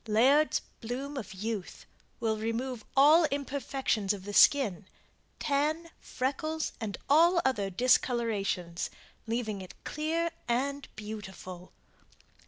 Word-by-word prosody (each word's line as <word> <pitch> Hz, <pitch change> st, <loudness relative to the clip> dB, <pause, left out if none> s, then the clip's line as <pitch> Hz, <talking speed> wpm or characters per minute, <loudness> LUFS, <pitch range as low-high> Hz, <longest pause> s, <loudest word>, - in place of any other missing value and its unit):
LAIRD'S 265 Hz, +8 st, +4 dB, 0.2 s
"BLOOM 265 Hz, +5 st, -4 dB
OF 215 Hz, -8 st, -6 dB
YOUTH" 210 Hz, -1 st, -5 dB, 0.3 s
will 220 Hz, -2 st, 0 dB
remove 230 Hz, +2 st, -3 dB
all 305 Hz, +5 st, +7 dB
imperfections 270 Hz, -7 st, -1 dB
of 195 Hz, -2 st, -7 dB
the 205 Hz, -, -5 dB
skin 205 Hz, -8 st, +5 dB, 0.5 s
tan, 310 Hz, +4 st, 0 dB
freckles 310 Hz, +5 st, -2 dB
and 205 Hz, -5 st, -3 dB
all 340 Hz, +5 st, +5 dB
other 210 Hz, -7 st, +1 dB
discolorations 205 Hz, -5 st, +1 dB, 0.4 s
leaving 220 Hz, -3 st, -2 dB
it 185 Hz, -, -10 dB
clear 325 Hz, +3 st, -1 dB, 0.2 s
and 275 Hz, +4 st, -1 dB
beautiful. 190 Hz, -4 st, -8 dB
245 Hz, 105 wpm, -30 LUFS, 210-285 Hz, 0.5 s, all